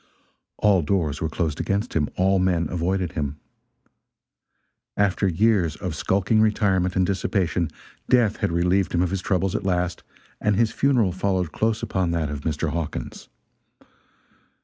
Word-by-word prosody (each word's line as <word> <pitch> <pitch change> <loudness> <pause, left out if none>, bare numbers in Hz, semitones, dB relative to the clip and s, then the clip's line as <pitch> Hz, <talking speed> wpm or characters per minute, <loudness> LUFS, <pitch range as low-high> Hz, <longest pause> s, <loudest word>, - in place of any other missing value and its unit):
All 100 -4 +3
doors 80 -2 -1
were 80 - -1
closed 80 -2 -2
against 100 +3 -1
him, 75 -3 0
all 95 +1 +2
men 90 -3 +1
avoided 90 +1 -1
him. 75 -1 -4 1.6
After 100 0 +2
years 95 -3 +2
of - - -4
skulking 100 +3 +1
retirement 95 -4 +2
and 95 - +3
dissipation, 90 -3 0 0.4
death 120 -5 +3
had - - -1
relieved 90 +3 +1
him 85 - +3
of 90 - -1
his 95 -1 -2
troubles 95 0 0
at - - -2
last, 90 -2 -1 0.4
and 105 -1 +1
his 110 +2 +2
funeral 125 -7 +2
followed 95 -2 -1
close 110 0 -1
upon 95 -3 -1
that 80 -3 -1
of 70 -1 -5
Mr. 80 0 -2
Hawkins. 80 -6 -5
90 Hz, 150 wpm, -24 LUFS, 85-100 Hz, 1.6 s, All